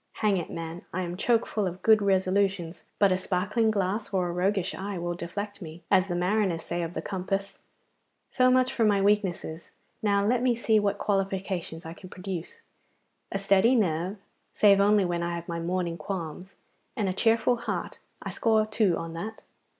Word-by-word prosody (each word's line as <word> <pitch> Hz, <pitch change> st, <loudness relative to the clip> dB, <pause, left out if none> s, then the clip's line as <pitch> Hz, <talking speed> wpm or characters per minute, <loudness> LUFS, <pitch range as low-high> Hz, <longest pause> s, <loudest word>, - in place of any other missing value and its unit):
Hang 210 Hz, -3 st, +1 dB
it, 170 Hz, -, -4 dB
man, 165 Hz, +1 st, -6 dB
I 185 Hz, +1 st, -2 dB
am 175 Hz, 0 st, -4 dB
choke 230 Hz, +4 st, +2 dB
full 210 Hz, -3 st, -1 dB
of 180 Hz, +1 st, -7 dB
good 220 Hz, -1 st, +6 dB
resolutions, 190 Hz, -3 st, +1 dB
but 200 Hz, -2 st, +4 dB
a 185 Hz, -, +3 dB
sparkling 205 Hz, +5 st, 0 dB
glass 205 Hz, +1 st, -1 dB
or 185 Hz, -2 st, +1 dB
a -, -, -2 dB
roguish 185 Hz, +1 st, 0 dB
eye 195 Hz, 0 st, -5 dB
will 175 Hz, 0 st, -2 dB
deflect 200 Hz, +5 st, -6 dB
me, 165 Hz, 0 st, -9 dB
as 190 Hz, -1 st, +4 dB
the 175 Hz, -, -2 dB
mariners 180 Hz, -1 st, +1 dB
say 175 Hz, 0 st, -3 dB
of 170 Hz, +1 st, -4 dB
the -, -, -3 dB
compass. 195 Hz, +1 st, -3 dB, 0.7 s
So 255 Hz, 0 st, +3 dB
much 255 Hz, 0 st, +3 dB
for 230 Hz, -, +1 dB
my 205 Hz, -2 st, +4 dB
weaknesses. 195 Hz, -5 st, 0 dB, 0.3 s
Now 200 Hz, -1 st, +2 dB
let 240 Hz, +3 st, +2 dB
me 250 Hz, -1 st, +2 dB
see 225 Hz, -2 st, +3 dB
what 205 Hz, -1 st, 0 dB
qualifications 190 Hz, -4 st, -2 dB
I 165 Hz, -, -6 dB
can 185 Hz, +1 st, -12 dB
produce. 180 Hz, -2 st, -6 dB, 0.7 s
A -, -, -1 dB
steady 195 Hz, +5 st, +4 dB
nerve, 185 Hz, -2 st, 0 dB, 0.4 s
save 200 Hz, -2 st, +6 dB
only 205 Hz, 0 st, +4 dB
when 175 Hz, -1 st, -1 dB
I 170 Hz, 0 st, -2 dB
have 170 Hz, 0 st, -7 dB
my 170 Hz, 0 st, -3 dB
morning 170 Hz, 0 st, -2 dB
qualms, 180 Hz, +2 st, -6 dB, 0.4 s
and 215 Hz, -6 st, 0 dB
a 185 Hz, -, 0 dB
cheerful 230 Hz, +4 st, +2 dB
heart; 235 Hz, -, -4 dB, 0.2 s
I -, -, -4 dB
score 220 Hz, -1 st, +2 dB
two 215 Hz, -5 st, +1 dB
on 165 Hz, 0 st, -5 dB
that. 215 Hz, +7 st, -6 dB
195 Hz, 190 wpm, -27 LUFS, 175-210 Hz, 0.7 s, good